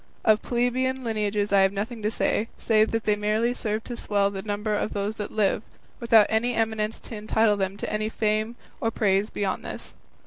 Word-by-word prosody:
Of 215 -1 +5
plebeian 255 +2 0
lineages 210 -3 -1
I 200 - +6
have 195 0 +4
nothing 215 +3 -4
to 210 - +1
say, 220 0 0
save 220 -1 +3
that 225 -1 -1
they 210 0 +2
merely 215 +3 +1
serve 220 -2 -3
to 245 - -6
swell 200 -3 0
the 195 -1 -5
number 210 +1 -2
of 210 - -1
those 205 +2 -2
that 210 - -4
live, 205 -1 +1 0.4
without 230 -3 +6
any 235 +2 +1
eminence 220 -1 0
to 230 - -8
entitle 215 0 +2
them 195 0 -2
to - - -4
any 215 0 -1
fame 215 +1 0 0.2
or 225 - +1
praise 205 -1 +1
beyond 195 -2 -2
this. - - -7
215 Hz, 200 wpm, -26 LUFS, 205-225 Hz, 0.4 s, I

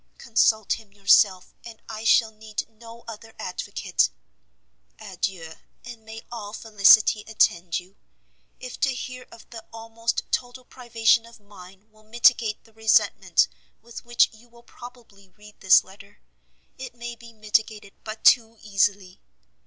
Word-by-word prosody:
Consult 220 -2 +1
him 215 -3 -19
yourself, 195 -1 +3
and 230 -2 -12
I 220 0 -8
shall 225 -1 +4
need 215 0 -7
no 230 +1 -15
other 225 0 -11
advocate. 180 - -2 0.9
Adieu, 165 -4 -5 0.3
and 235 -2 -11
may 220 +1 -10
all 210 -3 -8
felicity 215 -1 +4
attend 175 -6 +1
you! 185 +2 -18 0.6
if 250 -1 -9
to 265 -2 0
hear 255 0 -8
of 230 - -16
the 225 -2 -10
almost 225 0 -4
total 245 0 -3
privation 230 -2 0
of 235 0 -17
mine, 195 -1 -16
will 215 0 -24
mitigate 225 0 +1
the 225 - -24
resentment 220 0 +2 0.4
with 235 0 -11
which 240 0 +2
you 230 +2 -20
will 235 0 -20
probably 235 -6 -15
read 210 +3 -18
this 190 -1 +5
letter, 200 +2 -17 0.6
it 255 -2 -9
may 240 0 -7
be 235 0 -15
mitigated 215 -2 -2
but 215 0 -8
too 230 -2 +4
easily! 200 -2 -1
220 Hz, 140 wpm, -24 LUFS, 205-235 Hz, 0.9 s, this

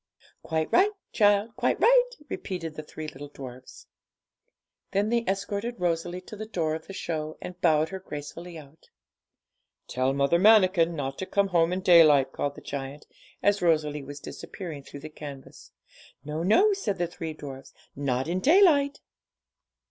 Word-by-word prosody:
'Quite 160 -1 -1
right, 390 +3 +5 0.2
child, 205 +1 +3
quite - - 0
right,' - - +4
repeated 170 - -5
the 155 - -6
three 155 +1 -8
little 145 0 -8
dwarfs. 130 -3 -11 1.1
Then 205 +2 +1
they 235 0 +1
escorted 200 +4 -2
Rosalie 175 +1 -1
to 200 - -10
the 215 +1 -7
door 165 -7 -1
of 160 0 -6
the - - -8
show, 155 -4 -4
and 180 0 -9
bowed 160 -2 +3
her 190 - -6
gracefully 170 +1 -8
out. 150 0 -15 1.0
'Tell 130 +1 0
Mother 140 +5 +2
Manikin 185 -5 +5
not 135 -2 -4
to 190 - -4
come 200 -1 +1
home 170 -2 +3
in 185 +1 -1
daylight,' 155 -7 +6
called 145 0 -3
the - - -11
giant, 140 +1 -6 0.4
as 205 0 +3
Rosalie 155 -3 +1
was 145 +1 -9
disappearing 160 -1 -8
through 140 +1 -11
the 155 - -7
canvas. 145 -3 -11 0.5
'No, 150 +2 -3
no,' 370 - +4
said 295 - -2
the 175 - 0
three 165 -2 -6
dwarfs; 135 -2 -10 0.2
'not 135 -1 -1
in 175 +2 -1
daylight!' 290 - +4
165 Hz, 160 wpm, -27 LUFS, 145-200 Hz, 1.1 s, daylight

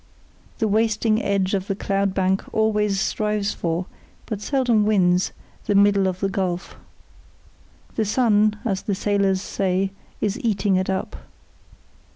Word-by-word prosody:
The 220 - +1
wasting 220 +1 +2
edge 195 -1 0
of 195 -1 -1
the 195 - -1
cloud 195 -1 -1
bank 190 0 +1
always 210 -2 +1
strives 210 0 -1
for, 170 +1 -2 0.4
but 210 -3 -5
seldom 245 -3 +2
wins, 185 -4 +2 0.3
the 205 - +1
middle 200 -1 +4
of 185 0 -3
the 195 - +2
gulf. 185 -2 -3 1.2
The 220 - 0
sun 215 -1 +3
as 195 -4 -1
the 200 - -2
sailors 200 -1 +1
say 190 0 -1 0.3
is 210 +4 -1
eating 205 -5 +1
it 185 +1 0
up. 190 - -2
200 Hz, 140 wpm, -23 LUFS, 190-215 Hz, 1.2 s, middle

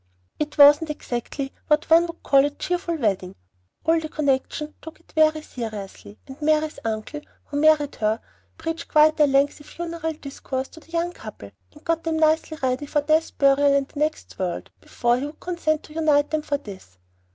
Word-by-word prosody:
It 300 0 -3
wasn't 295 +2 +7
exactly 270 -1 -4
what 300 0 +2
one 335 +1 +5
would 335 0 -10
call 275 -1 +5
a 290 - +2
cheerful 350 +3 -2
wedding. 195 - -1 0.5
All 325 +1 +4
the 315 -1 -6
connection 300 +1 -1
took 320 -1 -11
it 335 - -25
very 310 -1 +3
seriously; 215 -4 -7
and 270 +2 -12
Mary's 310 0 +1
uncle, 225 +7 -4 0.2
who 285 - -5
married 305 -2 +3
her, 215 +1 0 0.4
preached 325 0 -4
quite 310 0 +4
a 300 - +6
lengthy 280 +2 +2
funeral 330 +1 -5
discourse 275 -3 -5
to - - -14
the 325 - -22
young 340 +1 -1
couple, - - -10 0.2
and 300 - -18
got 330 0 0
them 325 -1 -1
nicely 315 0 +2
ready 260 +3 0
for 295 +1 +1
death, 310 +2 +1
burial, 280 0 +4
and 275 -1 0
the 285 - -8
next 305 +1 -2
world, 180 -2 -3
before 240 +1 0
he 280 - -3
would 295 - -12
consent 330 -3 -1
to 305 - -14
unite 300 -2 +2
them 310 -1 0
for 290 -1 -1
this. 190 - -12
300 Hz, 185 wpm, -23 LUFS, 275-315 Hz, 0.5 s, wasn't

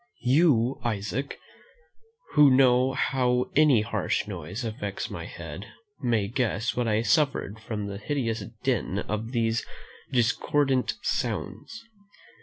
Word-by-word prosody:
You, 130 -2 +3
Isaac, 115 +4 -3 0.9
who 150 -1 +7
know 130 0 +4
how 125 -2 +1
any 145 -6 +5
harsh 105 - -1
noise 95 +4 -5
affects 105 -3 -4
my - - -6
head, 85 +4 -8 0.3
may 115 -6 +1
guess 115 -1 -1
what 125 -1 0
I 110 0 +1
suffered 135 -7 +1
from 110 -2 -4
the 100 -1 -5
hideous 115 -4 -2 0.2
din 120 -7 0
of 105 +3 -3
these 115 -2 0 0.5
discordant 130 +2 +1
sounds. 225 - -3
120 Hz, 115 wpm, -27 LUFS, 105-130 Hz, 0.9 s, who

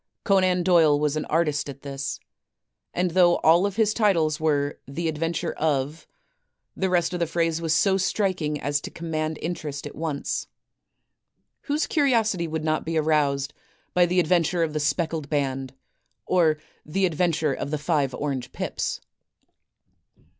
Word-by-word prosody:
Conan 185 -3 +3
Doyle 165 -5 +5
was 150 0 0
an 155 - -2
artist 150 -3 0
at 140 0 -9
this, 140 -1 -4 0.7
and 180 0 0
though 175 0 +5
all 170 +5 +5
of 200 - -6
his 215 -1 +2
titles 170 -9 +2
were 145 -2 0
"The 165 +5 -3
Adventure 165 +1 -1
of 150 0 -1 0.2
— - - -49
," - - -55
the 190 - 0
rest 180 0 +1
of 180 - -2
the 170 - +1
phrase 165 0 0
was 165 -1 -1
so 190 +4 +3
striking 185 -6 0
as 145 0 -1
to - - -6
command 155 -2 -3
interest 155 -4 -4
at 145 - -7
once. 160 - -3 1.2
Whose 295 +2 0
curiosity 225 - +2
would 160 0 -3
not 155 0 0
be 165 0 -2
aroused 150 -2 +1 0.4
by 175 -1 +4
"The 180 +1 +2
Adventure 175 0 +2
of 155 -2 -2
the 155 - -1
Speckled 155 0 -1
Band," 135 -3 -2 0.5
or 165 -4 +3 0.3
"The 190 +6 0
Adventure 165 -3 +1
of 140 - -4
the 150 - -1
Five 145 -4 0
Orange 140 -4 -3
Pips"? - - -3
160 Hz, 160 wpm, -25 LUFS, 150-180 Hz, 1.2 s, Doyle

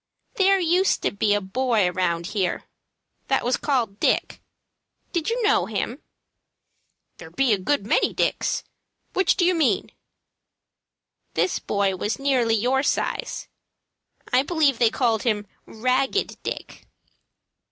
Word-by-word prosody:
"There 390 0 +3
used 360 +2 +2
to - - +1
be 205 0 +1
a 205 - 0
boy 220 0 +1
around 175 -2 -1
here 190 -4 -1 0.6
that - - +1
was 245 +1 +2
called 235 -8 -1
Dick. - - 0 0.7
Did 340 0 -1
you 470 +2 -1
know 420 -1 +3
him?" 225 +6 -3 1.2
"There - - -10
be 270 -4 +2
a 200 - 0
good 200 +3 0
many - - +2
Dicks. - - -1 0.5
Which 380 -2 +2
did 350 - +3
you 365 - +4
mean?" 275 - +1 1.4
"This 370 - +1
boy 200 -2 0
was 210 +4 -2
nearly 255 -5 +2
your 250 +5 +1
size. - - -2 0.9
I 250 - +5
believe 285 -4 +1
they 235 - +5
called 225 -3 +1
him 210 -4 0 0.2
'Ragged 255 - -1
Dick.'" - - -7
250 Hz, 130 wpm, -24 LUFS, 205-305 Hz, 1.4 s, I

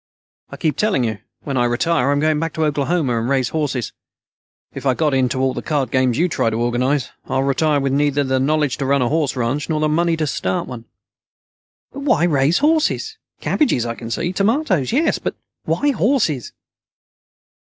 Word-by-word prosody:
"I - - -9
keep 155 -3 -1
telling 210 - +1
you. 110 -3 -2 0.2
When 140 -2 -3
I 120 - +3
retire, 135 +3 +1
I'm 145 0 +2
going 155 0 +2
back 165 0 -2
to 160 - 0
Oklahoma 145 -4 0
and 115 +3 -2
raise 130 -3 +1
horses. 140 -7 -2 0.8
If - - -7
I 130 - +3
got 150 -1 +1
into 130 -1 +1
all 130 0 +1
the - - -4
card 140 -6 -1
games 130 -2 +2
you 175 - +3
try 155 - 0
to 110 - -3
organize, 120 +2 0
I'd 130 0 0
retire 145 +2 +1
with 135 -1 -1
neither 145 0 +2
the 130 -1 0
knowledge 145 0 +1
to 140 -2 -2
run 140 -1 +2
a 120 - 0
horse 150 -3 0
ranch, 130 +6 -2
nor 155 -1 0
the 155 - +2
money 165 +2 +1
to 155 - 0
start 95 -9 -2
one." 120 -3 -8 1.1
"But - - -8
why 270 - +2
raise 150 -1 +3
horses? 320 +8 +1 0.2
Cabbages, 235 - +1
I 115 - -2
can 115 -1 -8
see. 175 +9 -2
Tomatoes, 200 - +1
yes. 305 +7 +1
But - - -3 0.3
why 290 0 +1
horses?" 220 - 0
145 Hz, 195 wpm, -20 LUFS, 130-165 Hz, 1.1 s, I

